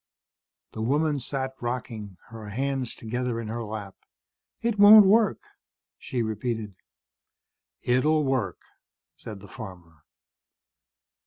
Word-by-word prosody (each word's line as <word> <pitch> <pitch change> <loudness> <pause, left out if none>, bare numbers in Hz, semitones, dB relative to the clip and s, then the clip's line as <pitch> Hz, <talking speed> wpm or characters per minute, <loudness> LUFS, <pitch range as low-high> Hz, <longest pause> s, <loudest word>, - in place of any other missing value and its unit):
The 110 - -6
woman 145 +5 +1
sat 130 +1 -3
rocking, 115 -5 -5
her 110 -2 -9
hands 135 +2 -2
together 120 +1 -3
in 115 -2 -5
her 115 +1 -4
lap. 105 -3 -6 0.7
"It 230 -3 0
won't 205 0 +10
work," 215 +2 +3 0.6
she 125 -3 -2
repeated. 110 -1 -3 1.1
"It'll 150 +5 +2
work," 130 - -1 0.6
said 105 -3 -9
the 100 - -12
farmer. 90 -8 -11
120 Hz, 105 wpm, -26 LUFS, 110-135 Hz, 1.1 s, won't